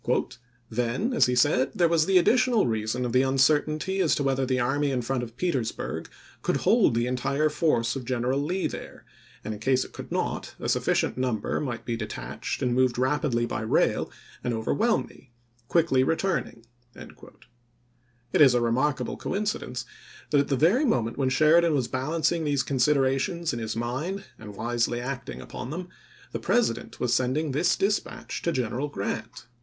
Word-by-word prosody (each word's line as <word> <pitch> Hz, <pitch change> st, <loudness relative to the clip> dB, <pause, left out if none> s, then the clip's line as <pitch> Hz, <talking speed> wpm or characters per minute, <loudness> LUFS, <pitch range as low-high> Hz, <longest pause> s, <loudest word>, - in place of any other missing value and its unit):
" -, -, -37 dB, 0.3 s
Then," 125 Hz, -, -1 dB
as -, -, +4 dB
he 125 Hz, -, 0 dB
said, 130 Hz, +2 st, +3 dB
" -, -, -25 dB
there 175 Hz, -, +4 dB
was 165 Hz, -1 st, +2 dB
the 190 Hz, -1 st, +5 dB
additional 230 Hz, +4 st, +4 dB
reason 110 Hz, +2 st, -1 dB
of 120 Hz, -, -3 dB
the 130 Hz, -, +5 dB
uncertainty 150 Hz, +7 st, +2 dB
as 175 Hz, -5 st, +3 dB
to 145 Hz, -, -1 dB
whether 135 Hz, -1 st, +1 dB
the 130 Hz, 0 st, +1 dB
army 140 Hz, +4 st, +1 dB
in 125 Hz, -3 st, -1 dB
front 130 Hz, +1 st, -1 dB
of 120 Hz, -1 st, -8 dB
Petersburg 135 Hz, -11 st, -2 dB, 0.3 s
could -, -, 0 dB
hold -, -, +3 dB
the 120 Hz, +1 st, +1 dB
entire 135 Hz, +4 st, 0 dB
force 150 Hz, -7 st, +1 dB
Report 135 Hz, -, -3 dB
of 120 Hz, -, -13 dB
General 130 Hz, +2 st, 0 dB
Lee 180 Hz, +6 st, -1 dB
there, -, -, -6 dB, 0.4 s
and, 110 Hz, -, -4 dB
in 105 Hz, -, -8 dB
case 130 Hz, +3 st, +1 dB
it -, -, -14 dB
could -, -, -9 dB
not, -, -, -2 dB
a -, -, -11 dB
^n°c^duecet -, -, -1 dB
sufficient -, -, +1 dB
number 125 Hz, -5 st, -1 dB
might 120 Hz, -5 st, -4 dB
be 120 Hz, -, -2 dB
detached 115 Hz, -, -5 dB
and 125 Hz, -, +1 dB
moved 130 Hz, -1 st, +2 dB
ofi865 125 Hz, -, -2 dB
66.ar' 130 Hz, -, +2 dB
rapidly 120 Hz, -5 st, 0 dB
by 110 Hz, -2 st, -3 dB
rail 110 Hz, -, +1 dB, 0.3 s
and 120 Hz, -2 st, -1 dB
overwhelm 210 Hz, -, +1 dB
me, -, -, -18 dB, 0.4 s
quickly 155 Hz, -5 st, +3 dB
return 165 Hz, +7 st, 0 dB
St? 115 Hz, -, -15 dB, 0.3 s
ing." -, -, -12 dB, 1.0 s
It -, -, +4 dB
is 135 Hz, -4 st, +7 dB
a -, -, +4 dB
remarkable 130 Hz, +5 st, 0 dB
coincidence 185 Hz, -, -3 dB, 0.5 s
that 145 Hz, -, +4 dB
at 140 Hz, -, +1 dB
the 140 Hz, -, +1 dB
p 150 Hz, -, +4 dB
•' -, -, +8 dB
very 245 Hz, -, +2 dB
moment 120 Hz, -, 0 dB
when 130 Hz, -2 st, +2 dB
Sheridan 155 Hz, +4 st, +4 dB
was 130 Hz, -4 st, 0 dB
balancing 155 Hz, +5 st, 0 dB
these 145 Hz, -3 st, +1 dB
considerations 140 Hz, +5 st, +1 dB
in 120 Hz, -, -3 dB
his 110 Hz, 0 st, -3 dB
mind 135 Hz, +12 st, -3 dB, 0.2 s
and 105 Hz, -2 st, -10 dB
wisely 120 Hz, +2 st, -1 dB
acting 120 Hz, -, -5 dB
upon 125 Hz, -, -7 dB
them, 175 Hz, +4 st, -5 dB, 0.4 s
the -, -, -3 dB
President 240 Hz, -, 0 dB
was 120 Hz, -1 st, +1 dB
sending 130 Hz, +5 st, +1 dB
this 155 Hz, +6 st, +2 dB
dispatch 205 Hz, +2 st, -2 dB
to 170 Hz, -, 0 dB
General 130 Hz, 0 st, -1 dB
Grant. 115 Hz, 0 st, -5 dB
130 Hz, 190 wpm, -26 LUFS, 120-155 Hz, 1.0 s, •'